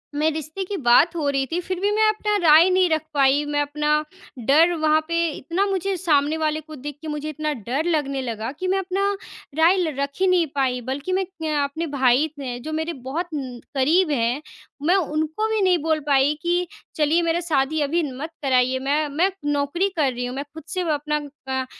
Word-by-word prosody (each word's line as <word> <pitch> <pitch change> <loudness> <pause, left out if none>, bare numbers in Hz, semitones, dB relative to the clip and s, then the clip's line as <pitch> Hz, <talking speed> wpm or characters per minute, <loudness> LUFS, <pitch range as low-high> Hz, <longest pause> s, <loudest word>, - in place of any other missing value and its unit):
मेरे 310 +1 +1
रिश्ते 315 +5 -4
की 400 +1 -4
बात 290 +8 +5
हो 300 -3 -1
रही 275 -1 0
थी, 335 +4 -2
फिर 370 0 -4
भी 405 +1 +1
मैं 435 0 +4
अपना 420 -1 0
राय 315 +4 +7
नहीं 370 -1 +3
रख 315 -1 +1
पाई। 280 +1 +3
मैं 290 0 -1
अपना 300 +1 0 0.4
डर 320 +6 +5
वहाँ 310 -1 +2
पे 335 0 0
इतना 340 +8 -1
मुझे 390 +1 -1
सामने 310 -3 +2
वाले 310 0 0
को 310 +1 -11
देख 290 +1 -7
के 315 - -8
मुझे 300 0 -4
इतना 305 0 -2
डर 255 - -3
लगने 285 -5 0
लगा 230 -1 -4
कि 370 - -2
मैं 385 +1 +1
अपना 390 +2 0 0.5
राय 340 +4 +5
ल 325 -5 0
रख 280 0 0
ही 380 - +3
नहीं 360 -3 +3
पाई, 255 -2 0
बल्कि 270 +8 -3
मैं 380 +1 +1
क्य 325 -4 -5
अपने 315 +4 -3
भाई 265 +1 +3
थे 250 -3 -4
जो 310 +5 -6
मेरे 320 +2 -2
बहुत 320 +7 -3
उम, 255 -4 -5 0.2
करीब 310 +5 +3
हैं, 245 +1 0 0.5
मैं 365 - +5
उनको 315 +3 -1
भी 435 -2 +1
नहीं 365 -2 +4
बोल 315 -1 +1
पाई 280 +1 +4
कि 350 +1 0 0.3
चलिए, 315 +2 +2
मेरा 335 0 +1
शादी 305 -2 0
अभी 325 +4 +1
मत 310 +3 -5
कराइए, 260 -1 +2
मैं 290 +3 0
मैं 350 +7 +1
नौकरी 290 +7 0
कर 280 -4 +2
रही 245 +1 -3
हूँ, 250 +1 -5
मैं 280 - -3
खुद 320 -1 -9
से 360 +3 -2
व 330 - -3
अपना 300 +1 -1 0.3
क 260 0 -1
310 Hz, 215 wpm, -23 LUFS, 280-345 Hz, 0.5 s, राय